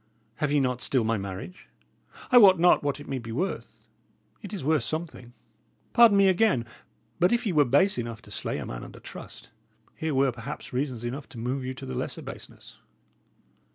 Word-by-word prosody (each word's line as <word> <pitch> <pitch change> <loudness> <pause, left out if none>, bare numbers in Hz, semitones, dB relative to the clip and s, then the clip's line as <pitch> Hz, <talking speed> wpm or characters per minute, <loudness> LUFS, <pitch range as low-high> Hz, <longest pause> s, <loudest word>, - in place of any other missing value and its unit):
Have 150 -1 -1
ye 145 - +3
not 125 -2 0
still 130 -4 +1
my 110 -1 0
marriage? 95 - -8 0.6
I 250 - +9
wot 190 -4 +8
not 175 +2 +5
what 145 0 -1
it 145 - -11
may 135 -1 -3
be 115 -1 -8
worth 170 +12 -4 0.6
it 205 - -9
is 195 -10 -5
worth 155 0 +3
something. 155 -7 -5 0.6
Pardon 230 -4 +7
me 200 -1 +6
again; 185 - +3 0.5
but 180 +1 +4
if 240 0 +1
ye 200 - 0
were 150 -2 +5
base 140 +6 +3
enough 115 -1 -5
to - - -15
slay - - -3
a - - -5
man - - -6
under - - -11
trust, - - -11 0.5
here 160 -3 -2
were, 135 0 +3
perhaps, 125 +4 -8
reasons 125 -3 -2
enough 130 +4 -5
to 130 - -12
move 125 +4 -2
you 130 +1 -4
to - - -8
the - - -6
lesser 60 - -4
baseness." - - -11
140 Hz, 195 wpm, -27 LUFS, 120-180 Hz, 0.6 s, I